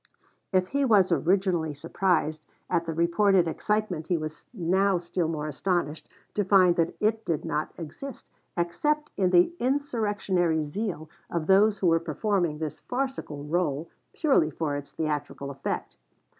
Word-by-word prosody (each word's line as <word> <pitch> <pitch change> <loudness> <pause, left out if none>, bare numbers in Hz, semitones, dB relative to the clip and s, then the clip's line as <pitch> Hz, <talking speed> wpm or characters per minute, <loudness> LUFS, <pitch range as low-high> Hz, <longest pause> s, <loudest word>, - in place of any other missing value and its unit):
If 185 -1 +2
he 280 0 +1
was 205 -8 +4
originally 170 -1 +1
surprised 160 0 0 0.3
at 170 -2 +1
the - - -1
reported 170 +2 +3
excitement 190 -2 -1
he 175 - +1
was 155 0 -7
now 190 -1 +2
still 175 0 -2
more 155 -2 -3
astonished 155 0 -2 0.2
to 205 - +1
find 185 -2 +5
that 165 -1 +1
it 220 +1 +1
did 165 -7 -2
not 150 +1 -2
exist 175 - -8 0.3
except 300 - 0
in 190 -2 +2
the 180 - +4
insurrectionary 205 - 0
zeal 165 -1 -4 0.2
of 170 -2 -2
those 200 +4 +5
who 190 - -2
were 165 0 +4
performing 175 -3 0
this 155 -1 -5
farcical 250 - -4
rôle 160 -1 -1 0.2
purely 270 - +3
for 150 -1 -2
its 145 0 -6
theatrical 145 -2 -3
effect. 135 0 -4
175 Hz, 145 wpm, -27 LUFS, 160-205 Hz, 0.3 s, find